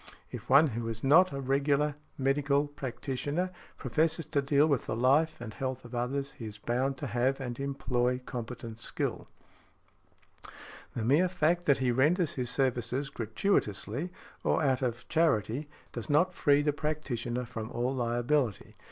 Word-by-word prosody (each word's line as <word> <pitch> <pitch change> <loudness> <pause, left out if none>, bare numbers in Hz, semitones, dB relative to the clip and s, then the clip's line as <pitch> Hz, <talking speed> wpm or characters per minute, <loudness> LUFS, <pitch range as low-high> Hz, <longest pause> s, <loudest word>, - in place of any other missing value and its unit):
If - - -8
one 140 +4 +7
who 115 -1 -4
is 115 0 -5
not 165 +7 +6
a 140 - -4
regular 140 +2 +1 0.2
medical 140 +1 +2
practitioner 145 +4 -3 0.3
professes 160 0 0
to 140 -1 0
deal 140 +1 +4
with 140 -6 0
the - - -1
life 140 +7 +3
and 115 -2 -7
health 130 +3 -4
of 120 - -11
others, 135 +3 -2
he 115 - -5
is 105 -1 -8
bound 130 +5 -1
to 145 - -5
have 125 +3 0
and 125 -2 -5
employ 125 -3 0
competent 115 -2 -6
skill. - - -3 1.7
The 115 - -2
mere 155 +9 +4
fact 175 +1 +1
that 140 - +5
he 130 -2 +1
renders 155 +7 +2
his 125 -2 -2
services 130 +1 0
gratuitously, 115 - -1 0.3
or - - +2
out 130 -2 +2
of 120 -2 -2
charity, 145 - +1 0.2
does 120 - -6
not 170 +5 +3
free 145 -3 +3
the 150 0 +2
practitioner 125 -6 -2
from 110 -2 -6
all 125 +2 -1
liability. 120 0 0
135 Hz, 155 wpm, -30 LUFS, 120-145 Hz, 1.7 s, one